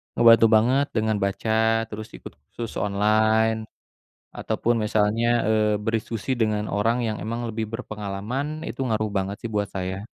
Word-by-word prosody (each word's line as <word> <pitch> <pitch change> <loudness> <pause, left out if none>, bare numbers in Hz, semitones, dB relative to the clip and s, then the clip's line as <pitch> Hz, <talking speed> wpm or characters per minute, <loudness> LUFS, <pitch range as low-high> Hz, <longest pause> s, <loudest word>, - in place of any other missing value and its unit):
ngebantu 115 -1 +7
banget 130 +6 +3
dengan 110 -1 +1
baca, 100 +3 0 0.3
terus 110 0 -6
ikut - - -11 0.2
sus 115 -1 -5
online 110 +2 +2 0.7
ataupun 120 0 0
misalnya, 105 +2 +1 0.2
eee, 105 -1 +2
berdiskusi 115 +3 -2
dengan 105 -2 0
orang 115 +4 +1
yang 110 -1 -2
memang 115 +1 -3
lebih 110 0 -3
berpengalaman, 115 +7 -4
itu 125 - -7
ngaruh 110 -2 0
banget 95 +1 -1
sih 115 - -2
buat 105 -1 0
saya. 95 +1 -4
110 Hz, 140 wpm, -24 LUFS, 105-115 Hz, 0.7 s, ngebantu